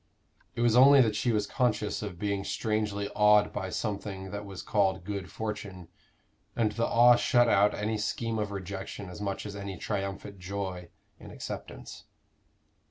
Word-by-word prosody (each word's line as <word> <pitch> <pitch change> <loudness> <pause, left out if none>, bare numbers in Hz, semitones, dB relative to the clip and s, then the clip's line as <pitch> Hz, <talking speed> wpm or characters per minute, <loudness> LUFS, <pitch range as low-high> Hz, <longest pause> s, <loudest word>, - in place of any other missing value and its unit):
It - - -2
was 120 -1 +3
only 135 +3 +8
that 110 -4 +2
she 115 +3 +1
was 105 -2 +1
conscious 110 -3 0
of 100 -4 -6
being 100 +1 -2
strangely 105 -1 -1
awed 105 0 +4
by 95 -2 -3
something 100 -2 -4
that 100 0 -6
was 95 -2 -8
called 95 -3 +1
good 100 -1 -5
fortune; 100 -5 -6 0.7
and 110 -2 +1
the 115 +2 -1
awe 120 +1 +6
shut 120 0 +3
out 105 -2 +4
any 105 +1 -2
scheme 110 +2 -2
of 105 -1 -1
rejection 95 0 -6
as 90 - -9
much 100 0 -3
as 105 -1 -6
any 100 -2 -6
triumphant 100 0 -4
joy 90 -2 -5 0.3
in - - -11
acceptance. - - -8
105 Hz, 165 wpm, -29 LUFS, 100-110 Hz, 0.7 s, only